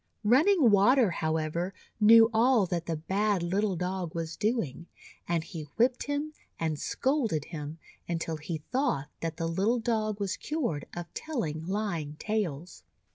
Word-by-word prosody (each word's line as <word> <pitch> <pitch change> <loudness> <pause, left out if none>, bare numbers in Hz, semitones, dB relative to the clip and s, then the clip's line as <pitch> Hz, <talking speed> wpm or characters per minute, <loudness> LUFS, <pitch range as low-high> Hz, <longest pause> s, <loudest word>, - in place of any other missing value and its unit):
Running 270 - +5
Water, 205 +2 +5
however, 160 +3 -1 0.2
knew 225 +1 +7
all 230 -1 +4
that 170 -2 -3
the 165 - -1
bad 195 +3 0
little 195 +3 0
Dog 180 -1 -3
was 165 -1 -3
doing, 205 - -1 0.4
and 170 -2 0
he 160 -2 -7
whipped 245 +2 +3
him, 290 +2 -2 0.3
and 160 -2 -1
scolded 240 - 0
him, 155 -1 -6 0.3
until 165 -1 -2
he 155 0 -5
thought 250 - 0
that 165 -1 -4
the 165 - -2
little 195 +8 +1
Dog 215 -3 -1
was 200 -1 -2
cured 245 - -2
of 175 -1 -7
telling 165 - -3
lying 180 -7 -2
tales. 175 - -3
190 Hz, 145 wpm, -29 LUFS, 165-225 Hz, 0.4 s, knew